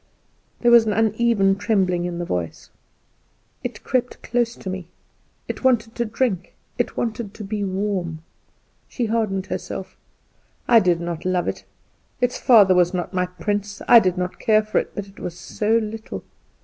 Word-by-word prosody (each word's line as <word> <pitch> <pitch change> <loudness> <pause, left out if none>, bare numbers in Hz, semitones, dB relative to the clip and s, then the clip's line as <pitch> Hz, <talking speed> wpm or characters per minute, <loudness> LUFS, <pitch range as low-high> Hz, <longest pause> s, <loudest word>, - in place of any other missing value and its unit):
There 240 - +4
was 235 -2 +7
an 210 - +1
uneven 220 -2 +2
trembling 185 -5 +1
in 175 -1 -3
the 175 - -3
voice. 90 - -4 0.9
"It - - -6
crept 250 -1 -1
close 240 -1 0
to - - -11
me; 185 -2 -4 0.6
it - - -5
wanted 240 -3 +2
to 235 - -1
drink, 220 -4 -2 0.2
it - - -1
wanted 225 -3 -3
to 215 - -7
be 205 +1 -3
warm." 185 -4 -2 0.6
She 245 - -2
hardened 215 -4 -1
herself 190 0 -6 0.7
"I 235 -2 +7
did 180 -5 +2
not 170 -1 -4
love 185 -1 0
it; - - -4 0.5
its 245 0 0
father 210 -6 +6
was 180 0 +3
not 180 +2 -3
my 180 0 0
prince; 205 +2 -3
I 235 - +9
did 185 -4 0
not 180 0 -3
care 215 -2 +3
for 215 - +1
it; - - -4
but 205 - -4
it 195 0 -16
was 175 -1 -6
so 215 +5 0
little." 220 0 -5
205 Hz, 170 wpm, -22 LUFS, 180-225 Hz, 0.9 s, I